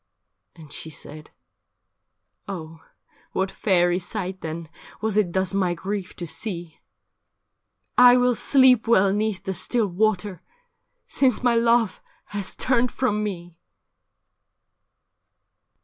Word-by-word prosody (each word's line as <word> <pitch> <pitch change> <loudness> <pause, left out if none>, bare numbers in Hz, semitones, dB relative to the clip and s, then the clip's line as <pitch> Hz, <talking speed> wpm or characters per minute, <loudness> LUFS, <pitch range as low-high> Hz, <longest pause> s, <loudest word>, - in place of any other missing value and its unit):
And 155 -4 -13
she 160 - -6
said, 155 0 -10 0.6
' - - -53
Oh, 165 -4 -7 0.5
what 190 0 -1
fairy 175 -3 +2
sight 185 0 -5
then 165 +1 -5 0.3
Was 220 -2 -1
it 210 -5 +2
thus 190 +1 -1
my 185 -3 +1
grief 195 +1 -5
to 175 - -5
see? 170 -2 -4 1.2
I 250 0 +8
will 250 0 +3
sleep 255 -1 +4
well 200 -4 +4
'neath 210 -3 -1
the 190 - -3
still 215 +5 0
water, 200 -1 -1 0.7
Since 255 -3 +1
my 245 -1 +4
love 230 -2 +2 0.3
has 200 -2 -3
turned 250 -1 +1
from 210 -5 0
me.' 175 -4 -6
195 Hz, 115 wpm, -24 LUFS, 175-225 Hz, 1.2 s, I